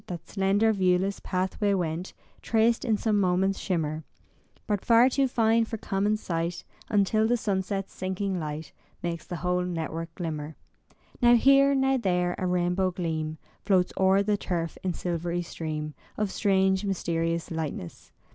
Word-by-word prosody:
That 170 -2 -7
slender, 205 +3 +2
viewless 190 0 +1
pathway 190 +2 0
went, 175 0 -3 0.3
Traced 225 +1 +2
in 220 -3 +1
some 210 -1 +1
moment's 190 +1 +1
shimmer; 155 -4 -2 0.6
But 205 -3 -1
far 235 +2 +6
too 270 +1 +2
fine 230 -2 +3
for 225 - -5
common 205 +1 0
sight 170 -3 -3 0.3
Until 215 +1 +2
the 240 +1 +2
sunset's 195 -2 -2
sinking 190 0 -2
light 155 0 -5 0.3
Makes 170 -1 -4
the 175 - -4
whole 180 +2 0
network 165 -1 -4
glimmer. 155 -3 -4 0.7
Now 240 0 +7
here, 275 +3 +5
now 270 0 +2
there, 180 -5 +1
a 185 - -1
rainbow 180 +1 +1
gleam 160 -3 -3 0.3
Floats 185 -3 +2
o'er 190 +1 +4
the 205 0 +1
turf 170 -4 -3
in 180 -3 -2
silvery 175 0 -2
stream 155 -2 -5 0.2
Of 210 -2 -1
strange 190 -1 +2
mysterious 170 -3 -1
lightness. 155 - -5
185 Hz, 145 wpm, -27 LUFS, 170-210 Hz, 0.7 s, Now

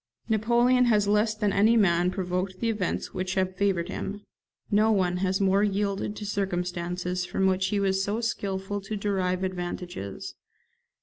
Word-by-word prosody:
Napoleon 240 +3 +3
has 210 -4 +3
less 210 +1 +2
than 210 -2 0
any 220 +4 +4
man 175 -4 +3
provoked 185 0 -3
the 230 -1 +1
events 205 -5 -3
which 185 0 -3
have 185 -1 0
favoured 190 -3 +1
him; 205 +1 -5 0.5
no 215 +2 +4
one 180 -4 +1
has 190 0 0
more 195 0 +3
yielded 200 0 -1
to 210 - -6
circumstances 180 -2 -2
from 190 +1 -1
which 190 0 +2
he 205 +1 0
was 195 -1 +1
so 205 +3 -1
skilful 200 -3 -3
to 210 +2 -5
derive 190 -2 -1
advantages. 175 - -5
195 Hz, 160 wpm, -27 LUFS, 185-210 Hz, 0.5 s, any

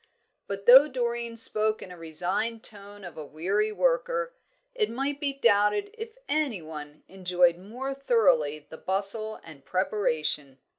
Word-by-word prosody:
But, 200 0 -6
though 265 +4 +9
Doreen 235 -3 -3
spoke 215 -1 +1
in 185 - -11
a - - -9
resigned 180 +8 -2
tone 205 -1 -4
of 175 -3 -10
a 155 - -6
weary 190 +9 -1
worker, - - 0 0.4
it 440 -4 0
might 275 +3 -3
be 285 -2 0
doubted 235 - +2
if 450 +1 -8
any 290 -9 0
one 150 -2 -10
enjoyed 180 -2 +2
more 250 +8 -6
thoroughly 185 - +2
the 160 - -11
bustle 200 +3 +1
and 155 -4 -13
preparation. 155 -7 -1
210 Hz, 145 wpm, -27 LUFS, 175-265 Hz, 0.4 s, though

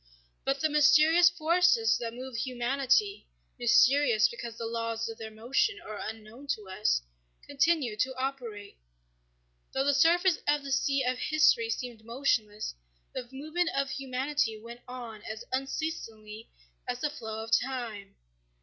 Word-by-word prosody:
But 270 0 -1
the 315 - +3
mysterious 305 +4 +6
forces 355 +6 +3
that 230 -1 -5
move 255 0 -7
humanity 265 - 0 0.3
(mysterious 240 -1 +5
because 235 -1 -7
the 230 - -4
laws 230 0 -2
of 225 -1 -8
their 220 -1 -6
motion 250 - 0
are 215 -1 -8
unknown 220 +5 -8
to 210 -2 -14
us) - - +1 0.4
continued 280 -6 +1
to 260 +2 0
operate. 245 - -5 0.9
Though 265 - +1
the 285 - +3
surface 340 +4 +4
of 295 -1 +2
the 275 - -6
sea 275 0 +1
of 250 0 -1
history 450 +9 +3
seemed 245 - -4
motionless, 220 -3 -1 0.4
the 245 -2 -6
movement 310 +6 -1
of 275 0 0
humanity 270 -2 -1
went 235 +2 -11
on 240 -4 -8
as 220 +2 -7
unceasingly 230 -6 -4 0.4
as 245 0 -3
the 300 - 0
flow 220 -6 -6
of 225 - -9
time. 230 -5 -1
255 Hz, 140 wpm, -29 LUFS, 225-290 Hz, 0.9 s, mysterious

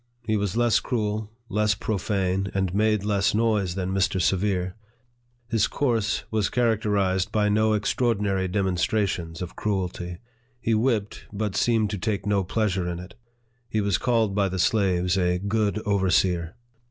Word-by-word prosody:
He 110 -1 +1
was 100 0 -1
less 120 -2 +4
cruel, 110 -3 -2 0.2
less 105 -1 +1
profane, 95 -2 -1
and 95 -2 0
made 105 0 +2
less 100 -1 +1
noise, 105 -5 +1
than 95 -1 -2
Mr. 95 0 +1
Severe. 90 0 0 0.7
His 115 -3 +2
course 115 -6 0
was 110 -3 +1
characterized 105 -5 +1
by 105 -1 +2
no 110 +1 +3
extraordinary 105 -3 0
demonstrations 95 -2 -1
of 90 - -8
cruelty. 90 -3 -3 0.4
He 115 -1 0
whipped, 110 -2 0
but 105 -1 -3
seemed 110 -3 +2
to 105 - -3
take 100 0 -2
no 100 -1 +2
pleasure 95 -2 -1
in 85 - -3
it. 90 +1 -9 0.6
He 110 - 0
was 100 -2 +1
called 115 -5 +1
by 100 -1 +1
the 95 - -4
slaves 95 -3 +2
a 90 0 +2
good 100 +2 0
overseer. 90 -4 +1
100 Hz, 150 wpm, -25 LUFS, 95-110 Hz, 0.7 s, less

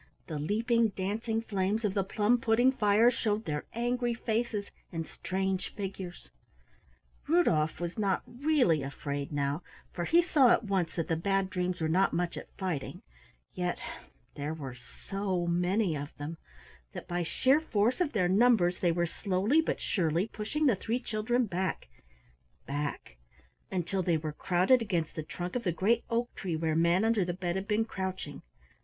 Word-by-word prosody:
The 155 -3 -4
leaping 225 +8 +2
dancing 220 +4 -1
flames 205 +1 0
of 200 - 0
the 195 -1 +1
plum 210 +5 +2
pudding 235 +3 +4
fire 220 0 +4
showed 220 -2 -1
their 150 -3 -3
angry 240 0 0
faces 225 -3 -2 0.2
and 165 -2 -3
strange 190 +1 -3
figures. 190 -3 -6 1.0
Rudolf 165 - +3
was 175 +4 -4
not 195 -3 +1
really 250 - +2
afraid 140 +1 -4
now, 145 +2 -1 0.3
for 175 - -2
he 340 - +5
saw 280 -7 +5
at 235 - +4
once 190 -5 -1
that 165 - -1
the 165 - +1
Bad 195 +3 0
Dreams 180 -1 -1
were 160 - 0
not 185 +5 +3
much 175 +1 -1
at - - -8
fighting, 180 -8 -3 0.5
yet 180 -1 -2 0.5
there 145 +2 -4
were 135 -5 -6
so 185 +8 -3
many 175 +1 +1
of 145 0 -6
them 155 +3 -6 0.5
that - - -7
by 175 0 -1
sheer 260 - +3
force 240 - +1
of 320 -5 0
their 185 -5 +2
numbers 190 -3 +4
they 175 - +3
were 175 +1 +1
slowly 200 - +1
but - - -2
surely 170 +1 0
pushing 225 +9 -2
the 255 -7 +5
three 230 +5 -2
children 240 +1 0
back, 185 - -2 0.8
back, 140 - -4 0.5
until 190 +1 -1
they 170 -2 +2
were 155 -1 -4
crowded 185 - +3
against 175 -8 -1
the 155 - -4
trunk 175 +5 -6
of 250 - 0
the 180 - +1
great 215 +8 +2
oak 235 +1 -1
tree 175 -4 -3
where 160 0 0
Manunderthebed 180 0 +2
had 190 +1 -3
been 215 +1 +2
crouching. 185 -8 -5
190 Hz, 160 wpm, -30 LUFS, 170-225 Hz, 1.0 s, he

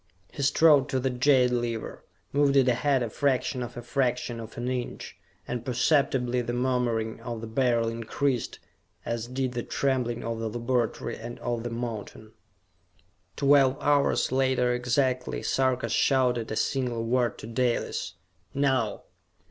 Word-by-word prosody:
He 145 - -5
strode 145 0 +5
to 130 - 0
the 130 +1 0
jade 125 0 +3
lever, 120 -2 -3 0.3
moved 140 -1 +3
it 135 -2 +5
ahead 125 +1 +2
a 115 - -3
fraction 130 -1 0
of 120 0 -6
a 120 - -6
fraction 125 -2 -1
of 115 -1 -9
an 120 +1 -3
inch, 125 -1 -4 0.3
and 120 -1 -3
perceptibly 125 -1 +1
the 120 0 -3
murmuring 120 -3 0
of 120 -2 -5
the 115 - -6
Beryl 115 0 +1
increased, 115 +2 -2 0.5
as 115 0 -3
did 130 0 -2
the 120 -1 -3
trembling 125 -3 -1
of 115 -1 -3
the 115 -1 -2
laboratory 120 0 -1
and 120 +1 -7
of 120 -1 -3
the 120 - -4
mountain. 115 -2 -6 1.0
Twelve 140 -2 +4
hours 145 -3 +2
later 130 -2 +2
exactly, 125 +1 0
Sarka 130 -1 +1
shouted 125 -4 +2
a 110 - -3
single 120 -2 -1
word 120 0 +1
to - - -9
Dalis. 120 +1 -1 0.4
"Now!" 130 -6 0
125 Hz, 150 wpm, -27 LUFS, 115-130 Hz, 1.0 s, strode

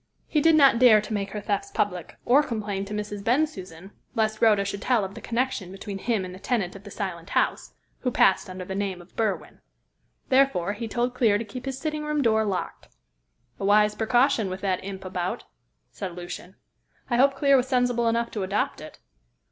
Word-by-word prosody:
He 300 - +1
did 325 +1 +5
not 275 -6 +6
dare 240 -4 +7
to 210 +1 -5
make 200 -1 -2
her 210 - -5
thefts 205 - -2
public, 185 - -2
or 265 +4 +6
complain 210 -7 -3
to 205 - -7
Mrs. 210 -1 -5
Bensusan, 200 - -1 0.2
lest 215 -1 0
Rhoda 210 -3 +4
should 200 0 -4
tell 240 -4 +2
of 190 - -8
the - - -10
connection 235 -6 -2
between 195 0 -7
him 220 -3 0
and 180 - -8
the 185 - -10
tenant 200 -4 -1
of 195 - -11
the - - -8
Silent 185 -3 -5
House, - - 0 0.2
who 255 - -1
passed 190 -6 +3
under 185 0 -7
the 190 - -5
name 195 -2 -2
of 175 +1 -17
Berwin. 220 -3 -2 0.7
Therefore, 260 -9 +3
he 225 +2 -5
told 240 +3 -1
Clear 225 -5 +3
to 230 - -4
keep 250 +5 -8
his 265 -1 -3
sitting 305 +1 -3
room 300 -1 0
door 220 -2 +3
locked." 195 -3 -4 0.7
"A - - -5
wise 210 +1 +4
precaution, 230 0 +2
with 185 +1 -5
that 190 -2 -1
imp 190 -1 -7
about," 180 -1 -3 0.5
said 185 -3 -6
Lucian. 180 +1 -8 0.6
"I 240 - +3
hope 270 +2 +4
Clear 280 -1 +4
was 255 -1 +2
sensible 245 -2 +1
enough 230 +1 0
to 210 - -4
adopt 195 -3 -1
it." 155 - -10
210 Hz, 205 wpm, -25 LUFS, 195-245 Hz, 0.7 s, dare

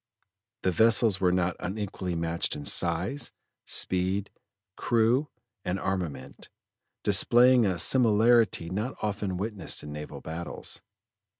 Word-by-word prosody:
The 95 - +2
vessels 110 +1 +3
were 90 -1 +3
not 90 -1 0
unequally 95 -2 -4
matched 85 0 -2
in 75 -1 -7
size, 90 - +1 0.3
speed, 95 +2 -1 0.4
crew, 120 +5 +1 0.3
and 90 +2 -2
armament, 90 -9 -4 0.5
displaying 125 -1 +5
a 90 -2 -1
similarity 110 -3 +3
not 105 +7 -3
often 100 -3 -2
witnessed 100 -2 -3
in 75 0 -7
naval 75 0 -7
battles. 85 +2 -6
95 Hz, 110 wpm, -27 LUFS, 85-110 Hz, 0.5 s, displaying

